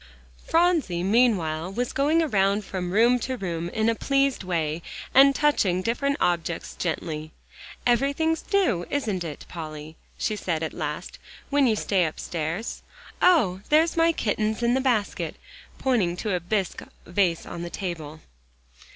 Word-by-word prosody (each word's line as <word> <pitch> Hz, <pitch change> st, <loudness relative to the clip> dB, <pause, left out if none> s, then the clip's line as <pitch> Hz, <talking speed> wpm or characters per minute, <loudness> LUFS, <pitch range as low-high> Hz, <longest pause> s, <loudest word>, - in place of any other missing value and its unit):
Phronsie, 325 Hz, -, +2 dB
meanwhile, 185 Hz, -7 st, +2 dB
was 245 Hz, +4 st, -2 dB
going 305 Hz, +4 st, +3 dB
around 200 Hz, -6 st, +1 dB
from 180 Hz, -2 st, -4 dB
room 235 Hz, +5 st, +4 dB
to 255 Hz, +1 st, -3 dB
room 170 Hz, -4 st, -3 dB
in 220 Hz, +4 st, 0 dB
a 230 Hz, -, +4 dB
pleased 275 Hz, 0 st, +1 dB
way, 165 Hz, -3 st, -1 dB, 0.3 s
and 275 Hz, +1 st, +7 dB
touching 195 Hz, -, +2 dB
different 280 Hz, +6 st, 0 dB
objects 170 Hz, -1 st, -1 dB
gently 155 Hz, -2 st, -3 dB, 0.6 s
"Everything's 280 Hz, +7 st, +1 dB
new, 355 Hz, -, +2 dB
isn't 215 Hz, -11 st, -1 dB
it, 155 Hz, -3 st, -7 dB
Polly," 155 Hz, -2 st, -8 dB, 0.2 s
she 215 Hz, -, -1 dB
said 165 Hz, -5 st, -2 dB
at 160 Hz, -, -3 dB
last, 150 Hz, +1 st, -5 dB, 0.3 s
"when 280 Hz, -2 st, +4 dB
you 220 Hz, -, +3 dB
stay 195 Hz, -3 st, +1 dB
upstairs? 165 Hz, +5 st, -4 dB, 0.4 s
Oh! 200 Hz, -, +4 dB
there's 320 Hz, +2 st, +4 dB
my 330 Hz, 0 st, +4 dB
kittens 220 Hz, -4 st, -1 dB
in 235 Hz, +1 st, +3 dB
the 265 Hz, -, +2 dB
basket," 240 Hz, -6 st, 0 dB, 0.4 s
pointing 205 Hz, -10 st, +1 dB
to 210 Hz, 0 st, -2 dB
a 180 Hz, -, +1 dB
bisque 190 Hz, +1 st, -2 dB, 0.2 s
vase 175 Hz, -1 st, +1 dB
on 170 Hz, -, -7 dB
the 175 Hz, -, -5 dB
table. 160 Hz, -5 st, -6 dB
200 Hz, 145 wpm, -25 LUFS, 170-265 Hz, 0.6 s, and